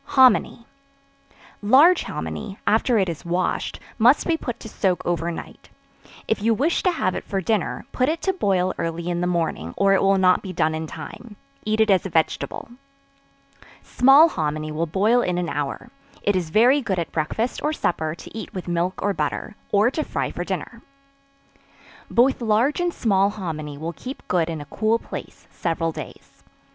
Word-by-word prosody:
Hominy. 255 -2 +5 1.0
Large 285 - +6
hominy, 200 -2 -5
after 225 +3 +3
it 195 -3 +2
is 170 -1 -5
washed; 175 +1 -2 0.2
must 245 +6 +5
be 335 - +2
put 245 -7 -5
to - - -8
soak 190 -4 -1
over 170 -1 -1
night; 170 - -8 0.6
if 220 - 0
you 225 +1 +2
wish 300 +9 +1
to 370 - +2
have 185 - -1
it - - -4
for 195 - -2
dinner, 205 +1 -1
put 255 +2 +1
it 325 +1 -1
to 385 - +1
boil 185 - +1
early 165 +1 -3
in 175 0 -1
the 180 - 0
morning, 165 - -2
or 195 0 +4
it 195 - +3
will 195 0 +4
not 185 -1 +4
be 190 - -6
done 160 -2 +1
in 160 0 -4
time; 215 +6 -9 0.3
eat 215 +1 +1
it 220 -1 +4
as 190 -3 +3
a 195 - -4
vegetable. 160 -2 -1 1.2
Small 270 +6 +6
hominy 155 - -3
will 160 +2 -2
boil 210 +9 +3
in 180 -6 -1
an 175 -2 -1
hour; 145 -1 -4 0.3
it 205 - +2
is 175 -3 -1
very 245 - +4
good 195 -7 -2
at 170 - -3
breakfast 195 +10 -2
or 300 - 0
supper 160 - -1
to - - -12
eat 220 - -6
with 185 - -5
milk 175 +2 -1
or 205 - +1
butter, 155 +6 -3 0.2
or 210 +4 +4
to 310 - -2
fry - - -3
for - - -4
dinner. - - -5 1.3
Both 255 +2 +3
large 230 +7 +2
and 350 0 +1
small 200 - +2
hominy 155 -8 -5
will 165 +3 -5
keep 260 +8 -9
good 170 -2 +1
in 160 -2 -4
a - - -8
cool 220 +9 +1
place - - -9
several 165 -1 -2
days. - - -10
195 Hz, 185 wpm, -23 LUFS, 170-230 Hz, 1.3 s, Large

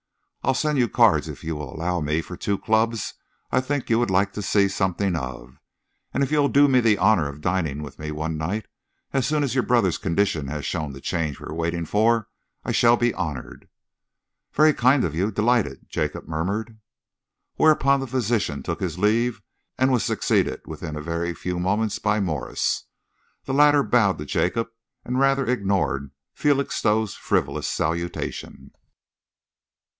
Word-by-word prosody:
I'll 135 - +2
send 150 0 +1
you 120 -2 +2
cards, 100 - +3
if 75 +1 -9
you 80 0 -3
will 75 0 -6
allow 90 +2 -1
me, 75 +2 0
for 90 - -8
two 100 +3 -1
clubs 110 +1 0 0.4
I 130 - +3
think 140 +1 -2
you 115 - +4
would 120 - +1
like 95 +1 +2
to 105 - -4
see 100 0 +3
something 95 -1 0
of, 65 -3 -6 0.5
and 140 - 0
if 135 - -2
you'll 145 -2 +3
do 145 +1 +5
me 130 -2 +4
the 115 -4 +3
honour 95 -6 +3
of 70 +1 -10
dining 80 -5 -1
with 70 - -10
me 75 0 -5
one 80 +1 -3
night, 90 +8 -3 0.5
as 135 -2 +1
soon 150 0 +1
as 135 -5 -1
your 130 -2 +2
brother's 115 -8 +2
condition 85 -5 0
has 75 +1 -4
shown 75 -4 -3
the 70 - -10
change 80 -5 -2
we - - -9
are - - -6
waiting 85 +1 -2
for, 110 +4 +2 0.4
I - - -1
shall 120 0 +4
be 120 -1 +1
honoured." 75 -5 -6 0.8
"Very 155 +1 +5
kind 130 +1 +3
of 80 - -1
you 95 +6 0
delighted," 115 +2 +1
Jacob - - -3
murmured. 100 +8 -3 0.8
Whereupon 140 -3 +4
the 135 - -4
physician 115 - -1
took - - -3
his 85 -3 -3
leave 115 +5 +1 0.3
and 130 +1 +3
was 125 -3 +2
succeeded - - 0
within 80 0 -6
a 75 - -5
very 85 +1 -2
few 90 -1 -3
moments 100 +4 0
by 110 0 +1
Morse. 90 -7 -1 0.6
The 135 - -3
latter 145 0 +5
bowed 100 -9 +2
to 75 - -6
Jacob 115 +9 0 0.4
and 125 +1 -1
rather 135 0 +3
ignored 95 - 0 0.2
Felixstowe's 110 -7 +1
frivolous 75 +1 -1
salutation. 85 +2 -3
100 Hz, 170 wpm, -24 LUFS, 80-120 Hz, 0.8 s, do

